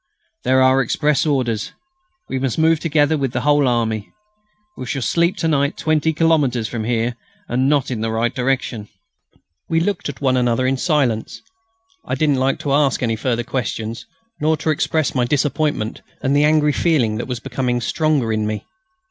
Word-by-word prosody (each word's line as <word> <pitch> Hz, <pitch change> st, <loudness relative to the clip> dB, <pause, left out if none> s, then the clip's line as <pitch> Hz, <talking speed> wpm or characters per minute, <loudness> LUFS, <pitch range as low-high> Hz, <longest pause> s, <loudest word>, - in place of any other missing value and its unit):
There 130 Hz, 0 st, +4 dB
are 130 Hz, +1 st, +4 dB
express 150 Hz, +3 st, +1 dB
orders. 120 Hz, -7 st, -1 dB, 0.5 s
We 130 Hz, -, -2 dB
must 130 Hz, -3 st, -2 dB
move 160 Hz, 0 st, +3 dB
together 155 Hz, -1 st, +2 dB
with 135 Hz, -3 st, -2 dB
the 120 Hz, -, -1 dB
whole 145 Hz, -1 st, +3 dB
army. 110 Hz, -3 st, -1 dB, 0.6 s
We 130 Hz, -, -7 dB
shall 130 Hz, +2 st, -2 dB
sleep 170 Hz, +6 st, +1 dB
to 165 Hz, -, 0 dB
night 140 Hz, -1 st, +1 dB
20 155 Hz, 0 st, +1 dB
kilometres 150 Hz, -8 st, +2 dB
from 110 Hz, -1 st, -4 dB
here... 120 Hz, 0 st, 0 dB, 0.3 s
and 130 Hz, +3 st, +1 dB
not 145 Hz, -3 st, +1 dB
in 115 Hz, -3 st, -3 dB
the 115 Hz, -, -1 dB
right 115 Hz, +1 st, 0 dB
direction!" 125 Hz, -4 st, -2 dB, 0.8 s
We 165 Hz, -, +2 dB
looked 175 Hz, -2 st, -1 dB
at 145 Hz, -, -7 dB
one 130 Hz, -2 st, +2 dB
another 125 Hz, 0 st, +1 dB
in 130 Hz, +1 st, +1 dB
silence. 130 Hz, -8 st, 0 dB, 0.6 s
I -, -, -2 dB
didn't 145 Hz, -4 st, +1 dB
like 135 Hz, +1 st, +1 dB
to 140 Hz, -, -1 dB
ask 140 Hz, -3 st, +2 dB
any 115 Hz, -2 st, +1 dB
further 120 Hz, +1 st, -1 dB
questions, 115 Hz, -2 st, -4 dB, 0.3 s
nor 155 Hz, +1 st, +2 dB
to 155 Hz, -, 0 dB
express 155 Hz, 0 st, 0 dB
my 125 Hz, -2 st, +1 dB
disappointment 145 Hz, -3 st, -1 dB, 0.2 s
and 135 Hz, +1 st, +2 dB
the 145 Hz, +1 st, +4 dB
angry 150 Hz, -1 st, +3 dB
feeling 130 Hz, -12 st, +1 dB
that 120 Hz, -, -4 dB
was 125 Hz, -2 st, -3 dB
becoming 125 Hz, -1 st, -2 dB
stronger 140 Hz, -2 st, 0 dB
in 110 Hz, -1 st, -1 dB
me. 105 Hz, 0 st, -4 dB
130 Hz, 180 wpm, -20 LUFS, 120-150 Hz, 0.8 s, There